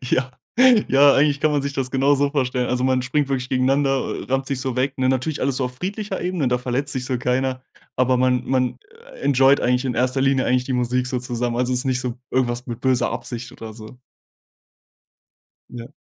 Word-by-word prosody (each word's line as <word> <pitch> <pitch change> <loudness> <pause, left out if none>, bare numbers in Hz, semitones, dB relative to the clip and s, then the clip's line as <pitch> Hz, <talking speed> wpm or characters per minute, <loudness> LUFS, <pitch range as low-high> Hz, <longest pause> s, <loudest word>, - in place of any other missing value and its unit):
Ja. 130 +1 -1 0.6
Ja, 140 +1 +6
eigentlich 145 0 +3
kann 155 - +2
man 145 - +1
sich 140 0 -4
das 130 -1 -2
genauso 140 +1 +2
vorstellen. 125 -3 -1
Also, 125 0 0
man 130 -1 +2
springt 135 +3 0
wirklich 130 -2 -2
gegeneinander, 135 +1 +1
äh, - - -8
rammt 135 +1 -1
sich 135 -1 -2
so 130 -2 -3
weg, 130 +1 0
ne? 130 - +1
Natürlich 130 +3 -1
alles 130 -1 0
so 135 - 0
auf 125 - -8
friedlicher 200 - -4
Ebene, 175 -7 -1
da 125 - +2
verletzt 130 +3 -3
sich 130 -1 -3
so 125 -1 -2
keiner. 130 +1 -1 0.3
Aber 130 0 +2
man 125 0 +2
man, 130 -1 0 0.4
äh, - - -14
enjoyed 135 0 +4
eigentlich 125 +1 +1
in 130 -2 -2
1. 130 +2 0
Linie 135 -1 +2
eigentlich 125 0 +1
die 130 - -3
Musik 125 0 0
so 130 -1 -2
zusammen. 120 -1 -3
Also, 125 +1 0
ist 125 - +1
nicht 130 -2 0
so 125 -2 -3 0.2
irgendwas 125 -1 -1
mit 120 -2 -6
böser 130 -2 +1
Absicht 120 -1 -6
oder 110 -1 -9
so. 110 +2 -12 1.7
Ja. 120 -1 -9
130 Hz, 210 wpm, -21 LUFS, 125-135 Hz, 1.7 s, Ja